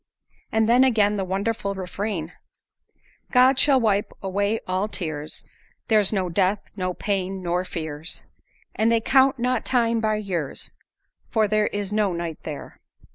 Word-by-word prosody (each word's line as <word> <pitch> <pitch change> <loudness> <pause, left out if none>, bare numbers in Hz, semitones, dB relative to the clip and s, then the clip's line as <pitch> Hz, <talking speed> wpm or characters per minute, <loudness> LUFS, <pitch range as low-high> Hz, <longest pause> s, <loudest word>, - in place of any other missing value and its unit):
And 220 0 +2
then 245 +3 +6
again 210 -5 +3
the 195 - -1
wonderful 200 +2 -2
refrain: 185 -2 -4 1.0
"God 255 +1 +5
shall 275 -2 +5
wipe 210 -3 +1
away 200 +3 0
all 185 +3 0
tears; 155 -7 -4 0.4
There's 215 -3 +4
no 190 -4 0
death, 190 +3 0
no 185 -2 -2
pain, 195 -2 -2
nor 175 +1 0
fears; 160 -2 -5 0.5
And 225 +1 +2
they 230 - +4
count 265 +3 +4
not 250 0 0
time 230 -2 +2
by 215 -1 +1
years, 180 -9 -4 0.6
For 220 -2 +2
there 215 0 +2
is 205 0 -3
no 210 -3 +2
night 170 -2 -4
there." 150 -3 -8
205 Hz, 145 wpm, -24 LUFS, 185-225 Hz, 1.0 s, then